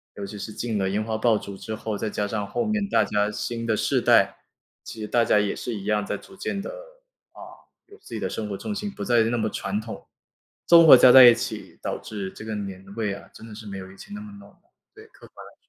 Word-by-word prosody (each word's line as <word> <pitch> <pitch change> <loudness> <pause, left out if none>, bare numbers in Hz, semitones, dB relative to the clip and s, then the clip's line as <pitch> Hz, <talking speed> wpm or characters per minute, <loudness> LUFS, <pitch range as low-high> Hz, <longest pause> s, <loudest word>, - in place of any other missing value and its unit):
尤 100 - -7
其 105 +1 -8
是 110 - -7
禁 115 -1 -3
了 95 -1 0
烟 105 +2 -1
花 110 0 -3
爆 110 -1 +2
竹 100 -1 -9
之 110 - -7
后， 110 -1 -4
再 110 - -3
加 105 0 -2
上 105 0 -3
后 240 - -2
面 215 -2 -1
大 - - +3
家 105 0 0
新 115 +2 -4
的 110 -2 +1
世 - - +1
代 - - +4 0.5
其 110 - -9
实 105 - -4
大 120 +2 +2
家 105 - +4
也 105 - -1
是 120 - -5
一 100 - -7
样， 105 -1 0
在 - - -3
逐 195 - -16
渐 200 0 -3
地， - - -6
啊， - - -15 0.5
有 410 - -16
自 - - -14
己 - - -4
的 - - -2
生 110 - -4
活 100 - -4
重 210 - -5
心， 205 0 -4
不 200 - -7
再 120 -2 +3
那 115 +2 0
么 110 -1 -1
传 100 +2 -3
统， 110 0 -9 0.6
综 170 -1 +7
合 - - +12
加 125 0 +7
在 130 -1 +10
一 120 -1 +8
起， - - -6
导 - - -3
致 100 -3 -6
这 110 - -11
个 110 -1 -4
年 95 -2 -7
味 110 -3 -2
啊， 100 - -11
真 - - -12
的 110 - -11
是 110 0 -10
没 100 -1 -6
有 95 0 -9
以 95 - -16
前 205 - -12
那 205 - -7
么 210 0 -10
浓。 200 - -17 0.4
对， 430 +1 -14
客 - - -17
观 - - -14
来 - - -14
说。 - - -29
110 Hz, 295 characters per minute, -24 LUFS, 105-130 Hz, 0.6 s, 合